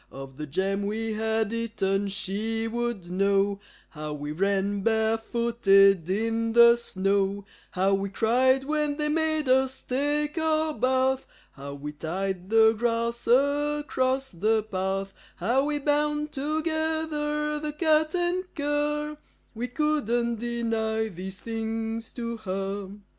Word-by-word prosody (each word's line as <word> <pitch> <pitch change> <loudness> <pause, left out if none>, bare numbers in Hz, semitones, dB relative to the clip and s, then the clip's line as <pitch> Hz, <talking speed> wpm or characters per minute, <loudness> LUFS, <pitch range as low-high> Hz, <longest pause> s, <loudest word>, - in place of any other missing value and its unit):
Of 135 -1 -9
the 150 0 -5
jam 195 +6 -1
we 220 +1 -2
had 220 0 0
eaten, 205 -4 -1
she 205 +4 -2
would 235 -6 -3
know; 195 +1 +2 0.3
How 150 -1 -6
we 145 0 -5
ran 195 +4 0
barefooted 220 -4 +3
in 225 +3 0
the 235 0 +8
snow; 195 -2 0 0.2
How 190 +1 +1
we 195 0 0
cried 255 +6 +3
when 300 0 -1
they 300 -1 -1
made 315 -1 0
us 265 0 +2
take 295 +4 -1
our 315 -1 +1
bath; 260 +2 +1 0.2
How 140 +1 -8
we 145 +1 -6
tied 185 +4 -4
the 220 0 +6
grass 235 +1 -1
across 275 0 +1
the 215 +5 +1
path; 195 -1 -2 0.2
How 245 +9 +1
we 295 0 0
bound 295 +1 0
together 305 0 -1
the 300 0 -3
cat 310 +1 +2
and 355 +1 0
cur 295 0 -1 0.4
We 240 +2 -3
couldn't 245 -4 0
deny 225 -2 -1
these 190 +1 -7
things 225 0 -4
to 235 -1 -4
her. 195 -1 -4
230 Hz, 125 wpm, -26 LUFS, 195-290 Hz, 0.4 s, the